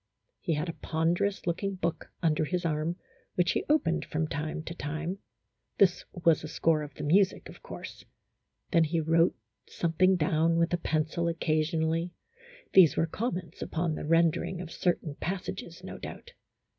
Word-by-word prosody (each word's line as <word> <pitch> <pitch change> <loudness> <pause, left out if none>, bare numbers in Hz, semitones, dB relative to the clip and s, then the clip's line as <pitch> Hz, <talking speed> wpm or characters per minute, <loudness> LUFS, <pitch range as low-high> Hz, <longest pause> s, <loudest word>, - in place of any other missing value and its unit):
He 165 - 0
had 150 +4 -2
a 165 - -3
pon 165 +1 0
derous 200 +3 -1
looking 190 +3 -1
book 170 -2 -3
under 155 -2 +3
his 175 +3 -1
arm, 155 +1 0 0.4
which 175 -1 +3
he - - 0
opened 170 - +2
from 155 +1 -2
time 155 +2 -3
to 170 - -6
time, 165 +5 -4 0.6
this 185 -3 +4
was 170 -4 +2
a - - -4
score 155 0 +2
of 145 -2 -8
the 150 - -6
music, 185 +6 +3
of - - -13
course; - - -9 0.7
then 165 -3 +5
he 165 +2 0
wrote 165 +2 +3 0.3
something 180 +3 +2
down 165 0 +2
with 170 +1 +2
a - - +3
pencil 160 +1 0
occasionally, 165 0 0 0.6
these 185 -5 +7
were 165 - +3
comments 180 -3 -4
upon 165 0 -1
the - - -4
rendering 165 +2 +2
of 175 -2 -7
certain 170 -4 0
passages, 180 +5 -5
no - - -7
doubt. 485 - -9
165 Hz, 165 wpm, -29 LUFS, 155-175 Hz, 0.7 s, these